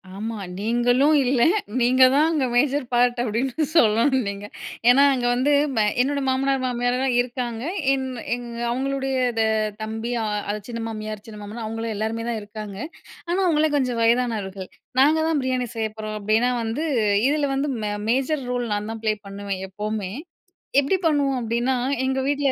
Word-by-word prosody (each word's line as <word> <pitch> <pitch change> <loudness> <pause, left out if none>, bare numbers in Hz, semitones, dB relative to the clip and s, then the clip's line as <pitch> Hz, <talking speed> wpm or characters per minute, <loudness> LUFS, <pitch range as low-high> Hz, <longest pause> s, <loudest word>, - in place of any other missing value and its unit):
ஆமா 220 +2 -4 0.2
நீங்களும் 245 +7 +3
இல்ல 250 -1 +1 0.4
நீங்க 255 +2 +4
தான் 300 +3 +4
அங்கே 300 -5 +1
மேஜர் 275 +2 +2
பார்ட் 245 0 +3
அப்படின்னு 250 +6 -1
சொல்லணும் 255 -1 +4
நீங்க. 200 0 -5 0.4
ஏன்னா 275 +3 +7
அங்க 250 -2 -1
வந்து, 260 +4 +1 0.5
என்னோட 280 +2 0
மாமனார் 270 0 +1
மாமியார்லாம் 250 +1 0
இருக்காங்க. 240 -2 -4 0.3
என் 265 -1 -1 0.3
எங்க 240 -1 -8
அவுங்களுடைய 270 +2 -1 0.3
தெ 220 - +4 0.4
தம்பி, 220 +2 -4
அ - - -1 0.3
அது 210 - -3
சின்ன 230 -1 -4
மாமியார், 215 -1 -6
சின்ன 210 -1 -9
மாமனார் 220 +2 -6
அவங்களும், 225 0 -3
எல்லாருமே 220 +2 -2
தான் 230 -2 -2
இருக்காங்க. 205 -1 -8 0.5
ஆனா 355 +2 +1
அவுங்க 310 -2 +3
கொஞ்சம் 250 -3 0
வயதானவர்கள். 225 -5 0 0.3
"நாங்க 305 +3 +5
தான் 315 -3 +1
பிரியாணி 255 -1 -1
செய்ய 220 -1 -1
போறோம்." 215 0 -4
அப்டின்னா 220 +4 +2
வந்து, 230 +8 -2 0.4
இதில 290 -1 +1
வந்து 285 +2 0
மெ 210 - -1 0.2
மேஜர் 270 +3 +1
ரோல் 245 -1 -1
நான் 205 +1 -3
தான் 225 - -8
ப்ளே 215 - +3
பண்ணுவேன் 200 -1 -5
எப்பவுமே. 210 -1 -4 0.7
எப்டி 285 +8 +1
பண்ணுவோம் 280 -4 +1
அப்டின்னா, 240 +3 0 0.3
எங்க 265 0 0
வீட்ல 285 -1 +1
245 Hz, 155 wpm, -23 LUFS, 220-270 Hz, 0.7 s, ஏன்னா